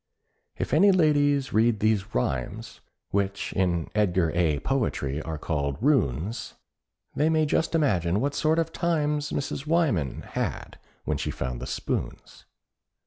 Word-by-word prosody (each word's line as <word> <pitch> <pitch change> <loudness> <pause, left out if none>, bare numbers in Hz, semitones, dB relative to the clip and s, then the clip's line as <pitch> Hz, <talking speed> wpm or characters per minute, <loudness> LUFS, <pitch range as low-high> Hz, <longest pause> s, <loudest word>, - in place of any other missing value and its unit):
If - - -3
any 195 +7 +6
ladies 145 -6 +2
read 110 0 +3
these 110 -1 0
rhymes, 60 0 -3 0.3
Which 100 0 -1
in 85 -4 0
Edgar 95 -6 +2
A. 85 -4 +2
Poetry 80 - -1
are 80 0 -5
called 70 -3 -2
"runes," 110 - 0 0.6
They 150 +2 +2
may 160 -1 +3
just 160 +3 0
imagine 95 - +2
what 140 +4 0
sort 155 +1 +1
of 165 - 0
times 150 -3 0
Mrs. 140 +1 -3
Wyman 140 - +1
had - - -4 0.3
when - - 0
she - - -2
found 65 -1 -4
the - - -5
spoons! - - -4
110 Hz, 140 wpm, -26 LUFS, -, 0.6 s, any